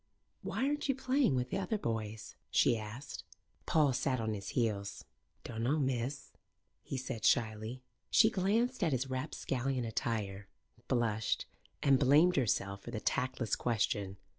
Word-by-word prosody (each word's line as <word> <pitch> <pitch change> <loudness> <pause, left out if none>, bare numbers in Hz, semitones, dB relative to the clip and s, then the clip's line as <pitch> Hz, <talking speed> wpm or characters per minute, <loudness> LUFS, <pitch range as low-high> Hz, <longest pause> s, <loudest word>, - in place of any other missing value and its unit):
"Why 260 - -1
aren't 295 0 -1
you 270 - +3
playing 265 - +2
with 125 0 -1
the 195 - 0
other 195 +3 -1
boys?" 110 - -4
she - - +4
asked. 115 +6 -7 0.4
Paul 150 -4 +4
sat 130 0 0
on 110 -1 -1
his 100 -2 -5
heels. 105 -4 -1 0.4
"Dunno, 120 +5 -1
miss," 135 -1 -2 0.5
he 135 - -5
said 125 -4 -5
shyly. 110 +2 +1 0.3
She 225 0 +6
glanced 225 +5 +1
at 160 -5 +2
his 130 +1 -1
rapscallion 130 -1 -2
attire, 105 -3 -2 0.4
blushed, 115 -4 0 0.4
and 135 -2 +5
blamed 150 +7 +5
herself 100 -6 0
for - - -9
the 120 -2 -3
tactless 125 -2 0
question. 100 -4 -1
125 Hz, 140 wpm, -33 LUFS, 110-145 Hz, 0.5 s, She